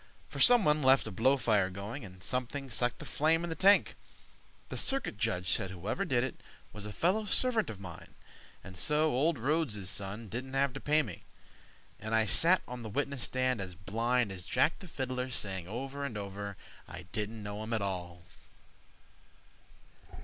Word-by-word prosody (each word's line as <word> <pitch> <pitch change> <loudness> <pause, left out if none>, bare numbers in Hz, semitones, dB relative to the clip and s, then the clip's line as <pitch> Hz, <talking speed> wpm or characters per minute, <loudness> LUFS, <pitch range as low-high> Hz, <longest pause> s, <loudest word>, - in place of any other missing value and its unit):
For - - -7
someone 195 -12 +5
left 130 0 +5
a 110 - -4
blow—fire 110 -3 +2
going, 100 +8 -6
And 95 -2 -10
something 130 +4 -2
sucked 120 +2 +1
the - - -9
flame 160 +3 +2
in 170 - -3
the - - -2
tank. 200 +3 +5 0.8
The - - -5
Circuit 270 - +1
Judge 90 -3 -1
said 95 -3 +2
whoever 95 - -3
did 125 -8 +1
it 130 - -5 0.3
Was 105 -1 -6
a - - -6
fellow 190 - +1
servant 230 +1 +3
of 105 -3 -7
mine, 90 -4 -10 0.5
and 95 - -10
so 150 - +3
Old 145 +5 +2
Rhodes' 120 - 0
son 100 +3 -3
didn't 130 +6 -5
have 135 -1 +2
to 135 - -6
pay 150 +2 +2
me. 105 -9 -8 0.8
And 110 +1 -2
I 110 0 +4
sat 175 - +5
on 125 0 -7
the 110 - -6
witness 140 +3 -2
stand 130 -3 0
as 90 -2 -6
blind 115 +4 0
As 90 -2 -7
Jack 130 +6 +2
the 185 - -10
Fiddler, 130 -4 -3
saying 95 -7 -3
over 135 +6 -5
and 125 -7 -4
over, 100 0 -6 0.3
"I 90 - -9
didn't 110 +1 -4
know 105 +1 -5
him 110 +1 -6
at 110 -3 0
all." 90 -3 -4
120 Hz, 180 wpm, -31 LUFS, 100-140 Hz, 0.8 s, someone